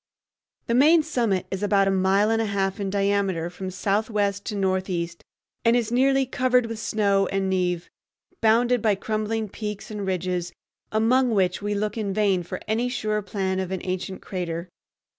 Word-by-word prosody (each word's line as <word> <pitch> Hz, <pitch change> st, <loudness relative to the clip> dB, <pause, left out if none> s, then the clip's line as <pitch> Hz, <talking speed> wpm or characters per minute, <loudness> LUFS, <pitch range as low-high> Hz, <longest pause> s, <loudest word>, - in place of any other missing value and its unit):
The 235 Hz, -, -1 dB
main 305 Hz, +6 st, +6 dB
summit 230 Hz, -, 0 dB
is 190 Hz, 0 st, -3 dB
about 200 Hz, -1 st, +3 dB
a -, -, +3 dB
mile 195 Hz, +3 st, +3 dB
and 225 Hz, 0 st, +2 dB
a 225 Hz, -, -1 dB
half 195 Hz, 0 st, -1 dB
in 200 Hz, -1 st, -2 dB
diameter 195 Hz, -4 st, 0 dB
from 185 Hz, +1 st, -6 dB
southwest 200 Hz, +1 st, 0 dB
to 210 Hz, -, -3 dB
northeast, 185 Hz, -3 st, -1 dB, 0.4 s
and 230 Hz, 0 st, +4 dB
is 235 Hz, -2 st, 0 dB
nearly 270 Hz, +2 st, +3 dB
covered 255 Hz, -1 st, +2 dB
with 230 Hz, -1 st, -5 dB
snow 200 Hz, -3 st, +1 dB
and 195 Hz, -1 st, -1 dB
névé, 180 Hz, -2 st, 0 dB, 0.6 s
bounded 240 Hz, +2 st, +3 dB
by 210 Hz, -2 st, +3 dB
crumbling 215 Hz, +2 st, -2 dB
peaks 210 Hz, +1 st, -6 dB
and 205 Hz, -2 st, -4 dB
ridges, 180 Hz, -1 st, -2 dB, 0.4 s
among 245 Hz, +4 st, +3 dB
which 185 Hz, -1 st, +1 dB
we 205 Hz, 0 st, -1 dB
look 210 Hz, +2 st, -2 dB
in 200 Hz, -3 st, -2 dB
vain 200 Hz, -4 st, +2 dB
for 175 Hz, -, -6 dB
any 230 Hz, +3 st, 0 dB
sure 215 Hz, -3 st, -1 dB
plan 190 Hz, -2 st, -2 dB
of 190 Hz, -1 st, -2 dB
an 190 Hz, -1 st, -3 dB
ancient 185 Hz, 0 st, -4 dB
crater. 175 Hz, -2 st, -4 dB
200 Hz, 175 wpm, -24 LUFS, 190-225 Hz, 0.6 s, main